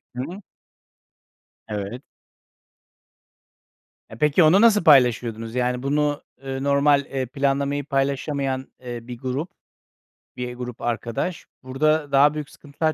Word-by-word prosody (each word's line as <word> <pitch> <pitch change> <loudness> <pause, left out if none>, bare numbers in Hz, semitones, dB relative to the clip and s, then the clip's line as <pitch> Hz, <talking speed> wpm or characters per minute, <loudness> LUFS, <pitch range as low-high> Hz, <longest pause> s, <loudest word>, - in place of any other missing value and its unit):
Hı 125 - -3
hı. 185 +7 -8 1.3
Evet. 105 +4 -5 2.1
E, 110 - -10
peki, 150 +4 +4
onu 180 +7 +6
nasıl 215 -5 +5
paylaşıyordunuz? 120 -5 +3
Yani, 125 0 0
bunu, 145 +1 0 0.2
ııı, 135 0 -4
normal, 140 0 +3
eee, 135 -1 -3
planlamayı 140 +2 -1
paylaşamayan, 135 -1 -1
iii, 120 -1 -6
bir 125 -1 -7
grup, 135 +8 -3 0.9
bir 125 0 -5
grup 125 -1 -7
arkadaş 120 +8 -3 0.2
burada 145 +3 0
daha 145 +2 +5
büyük 150 -2 -5
sıkıntılar 155 +2 -3
135 Hz, 115 wpm, -23 LUFS, 125-150 Hz, 2.1 s, onu